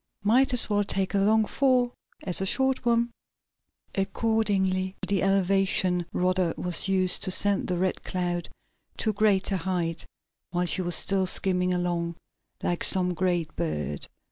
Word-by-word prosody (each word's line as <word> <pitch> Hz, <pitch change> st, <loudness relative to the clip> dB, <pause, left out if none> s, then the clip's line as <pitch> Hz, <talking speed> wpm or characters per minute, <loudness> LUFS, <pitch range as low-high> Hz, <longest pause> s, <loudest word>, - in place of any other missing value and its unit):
"Might 255 Hz, +7 st, +3 dB
as 250 Hz, -2 st, +2 dB
well 205 Hz, -1 st, +1 dB
take 195 Hz, -1 st, -1 dB
a 200 Hz, -, +2 dB
long 215 Hz, +2 st, +3 dB
fall 250 Hz, -1 st, +1 dB, 0.3 s
as 180 Hz, 0 st, +1 dB
a -, -, 0 dB
short 265 Hz, +3 st, +1 dB
one." 235 Hz, 0 st, +2 dB, 0.8 s
Accordingly, 195 Hz, -2 st, 0 dB
the 195 Hz, 0 st, +1 dB
elevation 190 Hz, -2 st, +1 dB
rudder 180 Hz, -1 st, 0 dB
was 180 Hz, 0 st, -1 dB
used 185 Hz, -1 st, +2 dB
to -, -, +3 dB
send 200 Hz, +1 st, +2 dB
the 180 Hz, -, -2 dB
Red 185 Hz, +1 st, -2 dB
Cloud 175 Hz, -2 st, -2 dB, 0.5 s
to 220 Hz, -, 0 dB
a -, -, -10 dB
greater 200 Hz, -2 st, +2 dB
height 170 Hz, -2 st, -3 dB, 0.4 s
while 180 Hz, 0 st, -1 dB
she 180 Hz, +2 st, +2 dB
was 175 Hz, -2 st, 0 dB
still 190 Hz, -1 st, +2 dB
skimming 180 Hz, -1 st, +2 dB
along 175 Hz, -1 st, -2 dB, 0.5 s
like 175 Hz, -, -1 dB
some 180 Hz, -2 st, +1 dB
great 175 Hz, -2 st, -1 dB
bird. 75 Hz, -2 st, -4 dB
190 Hz, 150 wpm, -26 LUFS, 180-205 Hz, 0.8 s, Might